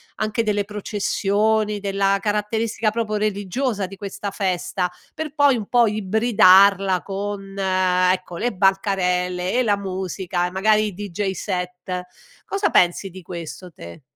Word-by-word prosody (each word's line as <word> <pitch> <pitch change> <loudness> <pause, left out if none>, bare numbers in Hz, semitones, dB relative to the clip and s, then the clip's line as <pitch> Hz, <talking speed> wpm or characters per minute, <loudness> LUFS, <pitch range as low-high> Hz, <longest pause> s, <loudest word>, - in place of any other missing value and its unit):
anche 215 +1 -1
delle 205 -2 0
processioni, 210 +1 0
della 195 0 +1
caratteristica 215 +2 -1
proprio 215 -1 -2
religiosa 210 +2 -1
di 190 +1 -9
questa 200 0 -6
festa, 185 -1 -1 0.2
per 310 -1 -5
poi 285 -3 +5
un 215 -4 -4
po' 240 -1 +4
ibridarla 195 -3 +4
con, 195 0 -5
ecco, 185 -2 +1
le 245 +5 -1
bancarelle 180 -2 +1
e 255 - +2
la 205 -3 +2
musica 185 -2 -3
e - - -7
magari 215 +3 +3
i 205 - -6
DJ 200 0 -3
set, 180 -1 -4 0.4
cosa 395 0 0
pensi 180 +2 +2
di 185 +1 -10
questo 175 +1 -8
te? 85 - -11
195 Hz, 135 wpm, -22 LUFS, 185-210 Hz, 0.4 s, poi